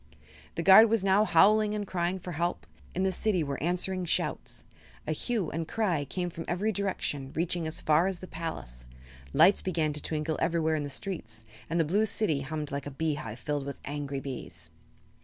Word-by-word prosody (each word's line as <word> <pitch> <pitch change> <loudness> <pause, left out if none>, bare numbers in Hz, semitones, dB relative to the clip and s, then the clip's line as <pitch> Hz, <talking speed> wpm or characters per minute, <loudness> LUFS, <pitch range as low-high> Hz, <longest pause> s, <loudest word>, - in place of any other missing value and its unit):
The 165 - -2
guard 195 +5 +9
was 225 -3 +2
now 195 +2 +4
howling 210 +4 +4
and 205 -1 -2
crying 180 0 -1
for 180 -1 -7
help. 170 +2 -2 0.3
In 185 - +1
the 190 - +2
city 185 -2 +1
were 140 -2 -4
answering 180 +3 0
shouts. - - -2 0.4
A - - -2
hue 200 +2 -1
and 165 0 -3
cry 180 -10 0
came 175 +5 -3
from 165 - -6
every 195 +5 0
direction, 185 -9 -2
reaching 170 0 -1
as 155 - -4
far 155 +4 +3
as 190 -2 -2
the 185 - -9
palace. 110 - -6 0.5
Lights 175 +7 +5
began 160 -5 0
to 150 - -6
twinkle 155 0 -2
everywhere 165 -1 +1
in 155 - 0
the 145 - -4
streets 110 - -6 0.3
and 165 +2 0
the 165 - +3
Blue 205 +8 +2
City 180 -10 +1
hummed 150 +1 -4
like 140 0 -3
a - - -3
beehive 145 -6 -3
filled 145 +1 -3
with 140 - -5
angry 145 -1 -3
bees. 90 - -7
165 Hz, 195 wpm, -29 LUFS, 145-190 Hz, 0.5 s, guard